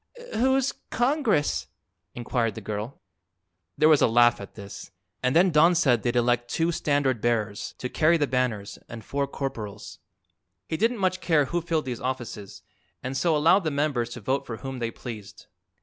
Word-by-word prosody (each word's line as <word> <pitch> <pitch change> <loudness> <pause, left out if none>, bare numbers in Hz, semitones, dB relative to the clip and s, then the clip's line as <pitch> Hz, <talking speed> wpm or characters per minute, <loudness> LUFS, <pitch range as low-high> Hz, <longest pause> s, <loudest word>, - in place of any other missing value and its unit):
"Who's 265 +2 +2 0.2
Congress?" 245 - +1 0.5
inquired 120 -3 -1
the - - -5
girl. 105 +5 -5 0.8
There 155 - +5
was 155 -2 +5
a - - +6
laugh, 120 -1 +4
at 100 - -10
this, 100 -2 -9 0.3
and 125 +2 +1
then 180 +2 +5
Don 165 +3 +5
said 135 -9 +3
they'd 120 0 -1
elect 120 0 +1
two 165 +5 +1
standard 140 -7 0
bearers, 110 -3 -1
to 125 - -4
carry 160 +6 +3
the 150 - +2
banners, 125 -7 -2
and 115 -3 -9
four 140 0 -1
corporals. 110 -7 -6 0.7
He - - -2
didn't 230 +7 +1
much 185 -2 0
care 155 -4 +3
who 175 +5 -2
filled 165 -2 -1
these 125 -3 -5
offices, 120 -6 -5 0.4
and 130 +1 -4
so 160 +3 +2
allowed 170 +6 +4
the 155 - 0
members 140 -5 0
to 125 - -8
vote 130 +6 0
for 115 - -5
whom 135 0 -6
they 115 -1 -1
pleased. 110 -4 -9
130 Hz, 175 wpm, -26 LUFS, 120-160 Hz, 0.8 s, a